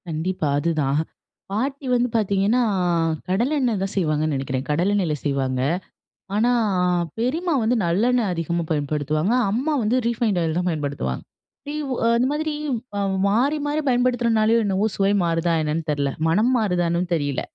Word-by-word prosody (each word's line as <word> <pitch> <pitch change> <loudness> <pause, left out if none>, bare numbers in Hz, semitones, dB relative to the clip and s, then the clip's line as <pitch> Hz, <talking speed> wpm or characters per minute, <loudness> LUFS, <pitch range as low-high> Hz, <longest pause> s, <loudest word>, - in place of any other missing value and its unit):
கண்டிப்பா. 165 +1 -2
அதுதான் 150 -3 0 0.5
பாட்டி 270 +7 -2
வந்து 245 0 +2
பார்த்தீங்கன்னா, 205 +2 +2 0.7
கடலை 235 +10 +1
எண்ணெய் 240 -6 +1
தான் 195 +1 -2
செய்வாங்கன்னு 155 -4 0
நினைக்கிறேன். 135 0 -3
கடலை 170 +7 +1
எண்ணெயில 175 -7 0
செய்வாங்க. 135 -3 0 0.7
ஆனா 230 +4 +3 0.7
பெரியம்மா 320 +9 0
வந்து 230 +3 +2
நல்லெண்ணெ 230 +8 +2
அதிகமாக 170 0 -2
பயன்படுத்துவாங்க. 155 - 0 0.2
அம்மா 265 +9 0
வந்து 225 +4 +2
ரீஃபைன்ட் 225 -5 0
ஆயில் 160 0 -1
தான் 180 0 0
பயன்படுத்துவாங்க. 140 - -3 0.5
ரீ - - -4 0.4
அந்த 245 +2 +2
மாதிரி 310 +1 -2 0.4
அ - - 0 0.3
மாறி, 260 +9 +2
மாறி 300 +1 0
பயன்படுத்துறதுனாலயோ! 235 -3 +2
என்னவோ! 195 +1 +1
சுவை 195 0 +2
மாறுதா 165 0 +1
என்னன்னு 155 +1 -2
தெரில. 140 -2 0 0.2
மனம் 210 +9 +3
மாறுதானும் 175 -4 0
தெரியல. 145 -5 -1
190 Hz, 135 wpm, -22 LUFS, 155-235 Hz, 0.7 s, ஆனா